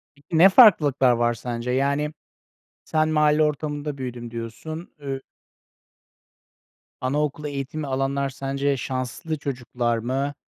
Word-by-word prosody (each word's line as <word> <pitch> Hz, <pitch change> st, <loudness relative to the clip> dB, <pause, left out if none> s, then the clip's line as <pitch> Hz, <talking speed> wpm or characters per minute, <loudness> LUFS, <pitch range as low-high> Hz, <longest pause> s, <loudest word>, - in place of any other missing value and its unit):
Peki, 145 Hz, -, -26 dB
ne 190 Hz, +4 st, +8 dB
farklılıklar 150 Hz, -, +6 dB
var 120 Hz, 0 st, +2 dB
sence? 120 Hz, +1 st, -4 dB
Yani, 140 Hz, +3 st, 0 dB, 0.7 s
sen 155 Hz, 0 st, +1 dB
mahalle 150 Hz, 0 st, +3 dB
ortamında 150 Hz, -1 st, -2 dB
büyüdüm 120 Hz, -2 st, -6 dB
diyorsun. 120 Hz, +9 st, -7 dB
Ü 135 Hz, -2 st, -4 dB, 1.8 s
Anaokulu 150 Hz, +3 st, -1 dB
eğitimi 140 Hz, +1 st, -4 dB
alanlar 135 Hz, +1 st, -1 dB
sence 135 Hz, +1 st, -1 dB
şanslı 130 Hz, +5 st, -4 dB
çocuklar 125 Hz, -4 st, -2 dB
mı? 135 Hz, +5 st, -2 dB
140 Hz, 110 wpm, -24 LUFS, 125-150 Hz, 1.8 s, ne